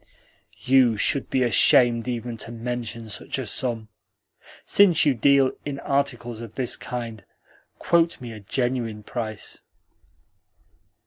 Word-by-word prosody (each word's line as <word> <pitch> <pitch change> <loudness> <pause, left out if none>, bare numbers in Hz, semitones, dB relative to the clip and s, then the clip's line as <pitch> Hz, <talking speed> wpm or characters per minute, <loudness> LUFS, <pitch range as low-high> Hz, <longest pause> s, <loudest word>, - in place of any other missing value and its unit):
"You 125 -4 +4
should 140 +6 +1
be 130 - +1
ashamed 120 +1 +4
even 120 -1 -4
to 115 - -7
mention 115 -1 -5
such 105 - -4
a - - -4
sum! 115 -4 -3 0.8
Since 175 -5 +4
you 145 - +4
deal 135 +2 +3
in 140 -1 -5
articles 120 -5 -2
of 115 -2 -10
this 130 -2 -1
kind, 115 -4 -6 0.5
quote 170 0 +1
me 120 -3 -8
a 110 - -9
genuine 115 0 -2
price." 110 -2 -6
120 Hz, 125 wpm, -24 LUFS, 115-135 Hz, 0.8 s, You